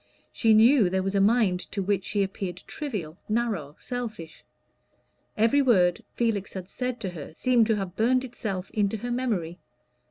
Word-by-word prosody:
She 220 -1 +3
knew 225 -2 +6
there 190 +1 0
was 195 +1 -2
a 200 - +3
mind 205 -3 +3
to 200 - -1
which 195 0 0
she 205 -1 +1
appeared 190 -2 -5
trivial, 200 - -5
narrow, 210 -10 -1
selfish. 220 -10 -6 0.9
Every 230 +6 +4
word 185 -9 +3
Felix 220 -4 -1
had 185 -2 -6
said 250 +1 -3
to 195 - -2
her 160 -2 -9
seemed 240 0 +3
to 220 - +2
have 195 -3 -4
burned 250 +4 +2
itself 200 -7 -5
into 210 0 0
her 245 +4 -5
memory. 200 -9 -2
205 Hz, 165 wpm, -26 LUFS, 185-235 Hz, 0.9 s, knew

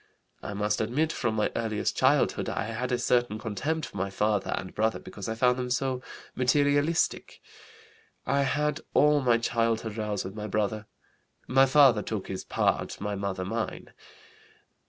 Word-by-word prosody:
I 100 - -6
must 105 +1 0
admit 145 +9 0
from 115 -3 -1
my 105 - +1
earliest 110 -2 -1
childhood - - +2
I - - -2
had 115 +3 -3
a 125 - +2
certain 120 -2 +1
contempt 135 +10 -2
for - - -10
my 100 +1 -1
father 105 +1 0
and 95 0 -6
brother 110 +1 +1
because 100 0 -8
I 110 - -2
found 125 +2 +2
them 125 0 -3
so 130 0 -1 0.3
materialistic. 145 +5 +1 0.9
I 140 +2 +2
had 150 +2 0 0.2
all 150 0 +5
my 120 -3 +4
childhood 115 -2 -1
rows 105 -3 -2
with 95 - -6
my 105 0 -5
brother. 105 +1 -1 0.6
My 135 +1 +5
father 130 -5 +6
took 105 -3 -5
his 95 - -4
part, - - -1
my 105 0 -3
mother 100 -2 -3
mine. 110 +3 -4
115 Hz, 160 wpm, -28 LUFS, 105-130 Hz, 0.9 s, father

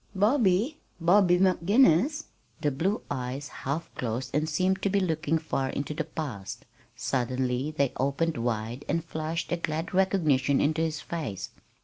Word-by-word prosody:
"Bobby? 220 +5 +2 0.2
Bobby 180 +1 +5
McGinnis?" 195 - +4 0.4
The 145 - +1
blue 185 +10 -1
eyes 130 +1 -3
half 150 +5 -4
closed 125 +1 -3
and 155 +2 +1
seemed 185 +5 +1
to 200 - +1
be 200 +1 +2
looking 160 -3 0
far 135 -4 -2
into 140 +3 -3
the 160 +1 -2
past. 135 - -6 0.3
Suddenly 130 +3 -1
they 140 -2 +2
opened 140 +5 0
wide 115 +2 -2
and 165 0 0
flashed 160 +1 -3
a 175 - +1
glad 160 +2 -3
recognition 155 -8 +3
into 155 +2 +1
his 160 -1 -1
face. 150 - -5
155 Hz, 145 wpm, -28 LUFS, 135-185 Hz, 0.4 s, Bobby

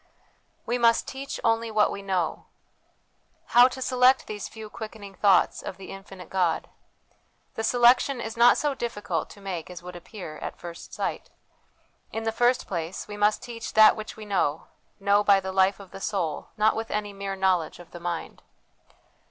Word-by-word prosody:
We 245 +1 -1
must 230 -1 +4
Teach 270 +1 -6
only 225 0 +2
what 215 -1 +3
we 200 - -5
Know. 190 -4 -2 1.1
How 245 +1 +9
to 260 0 -5
select 255 +1 +4
these 210 -1 -6
few 220 -1 -9
quickening 215 -2 -9
thoughts 195 -2 +3
of - - -7
the 195 - -10
infinite 195 -2 -11
God? 180 -4 0 0.8
The 225 - -4
selection 245 +3 +4
is 225 -1 -5
not 240 +1 +6
so 295 -1 0
difficult 235 -5 -3
to - - -13
make 185 -5 -5
as 180 -1 -9
would 180 0 -8
appear 175 -3 -9
at - - -6
first 170 -1 -9
sight. - - -4 0.8
In 225 - -4
the 225 - 0
first 245 +2 +2
place, 170 0 -4
we 205 - -7
must 210 +1 +2
teach 230 -2 -7
that 215 0 +8
which 215 -1 -7
we 215 - -8
know, 175 -7 -1 0.3
know 200 +1 +3
by 200 -1 +5
the 190 0 -5
life 190 +1 +3
of 195 -2 -12
the 195 - -9
soul, 175 -9 -2
not 215 +1 +3
with 225 0 -4
any 210 -1 -2
mere 195 0 -4
knowledge 185 -4 +1
of 175 -1 -14
the 175 - -9
mind. 170 -1 -5
205 Hz, 180 wpm, -26 LUFS, 190-225 Hz, 1.1 s, How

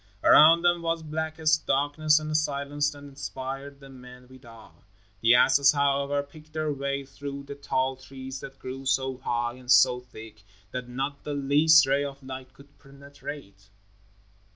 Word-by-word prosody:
Around 165 +3 +7
them 175 -1 +2
was 165 -1 -2
blackest 155 0 -1
darkness 145 +3 +2
and 155 0 -3
a - - -2
silence 145 -1 0
that 145 -1 -12
inspired 140 0 -7
the 135 -1 -14
men 125 -1 -14
with 130 +1 -17
awe. 115 -5 -15 0.5
The 115 +2 +5
asses, 140 +3 +5
however, 140 0 0
picked 155 +2 -17
their 155 -1 -2
way 140 0 -3
through 140 +1 -8
the 140 0 -8
tall 135 -2 -2
trees 130 0 -9
that 135 +1 -10
grew 135 +1 -7
so 130 0 0
high 120 -2 -2
and 125 -1 -15
so 125 0 +5
thick 110 -3 -13 0.3
that 125 -1 -6
not 135 +3 -4
the 145 -1 -4
least 150 +3 +5
ray 140 +1 +1
of 140 -1 -7
light 130 0 -8
could 140 +1 -20
penetrate. 140 -7 -11
140 Hz, 165 wpm, -26 LUFS, 130-145 Hz, 0.5 s, Around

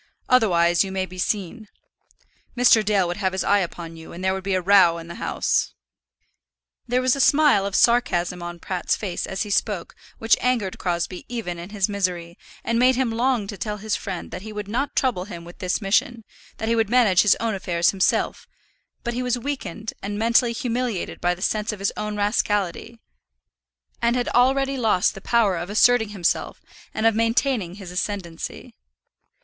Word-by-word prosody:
"Otherwise 175 -8 +4
you 195 - -6
may 190 0 -1
be 185 0 -11
seen. 210 +3 -2 0.9
Mr. 240 -3 +5
Dale 200 -4 +2
would 175 - -3
have 190 -2 -1
his 190 - -1
eye 205 0 +3
upon 170 -2 -5
you, 160 0 -11
and 175 +2 -8
there 190 - +2
would 190 0 -5
be 195 0 0
a - - +2
row 185 -2 +5
in 165 0 -9
the 170 - -9
house." - - 0 1.1
There 250 +1 +1
was 255 0 +3
a - - -5
smile 280 -8 +4
of 200 - -4
sarcasm 180 -8 +2
on 175 0 -6
Pratt's 180 +1 -2
face 190 -5 -4
as 190 - -2
he 210 - -7
spoke 200 -3 -1 0.2
which 225 0 +3
angered 235 -7 0
Crosbie 175 0 -3
even 215 -8 -4
in 175 +2 -8
his 205 -3 0
misery, 180 -4 -2 0.3
and 230 0 0
made 255 +1 +5
him 255 -2 0
long 240 -1 +1
to 200 -1 -8
tell 210 +1 -3
his 215 +1 -2
friend 190 -4 -6
that 180 - -6
he 215 +2 -8
would 210 -1 -6
not 255 +7 -2
trouble 235 -9 0
him 170 -4 -9
with 175 - -13
this 185 +3 -2
mission, 225 +4 +1 0.3
that 220 - -4
he 230 - +2
would 225 -3 +1
manage 225 -7 +4
his 210 - +4
own 225 -1 -1
affairs 175 -3 +1
himself; 190 -2 0 0.6
but 235 - -2
he 245 - -2
was 250 -1 0
weakened 245 -4 -5
and 205 +1 -4
mentally 235 +2 +3
humiliated 240 -4 -3
by 175 0 +1
the 185 - -7
sense 215 +1 0
of 210 - -6
his 195 0 -1
own 210 0 -4
rascality, 205 +1 -1 1.0
and 235 +1 +2
had 245 -1 -1
already 270 +2 +2
lost 220 -5 +2
the 195 - -10
power 210 -5 +2
of 175 +2 -5
asserting 220 +1 +4
himself, 190 -5 -1 0.3
and 220 - -2
of 225 - +5
maintaining 230 -4 0
his 195 -3 -9
ascendancy. 180 -2 -5
205 Hz, 190 wpm, -23 LUFS, 185-235 Hz, 1.1 s, Mr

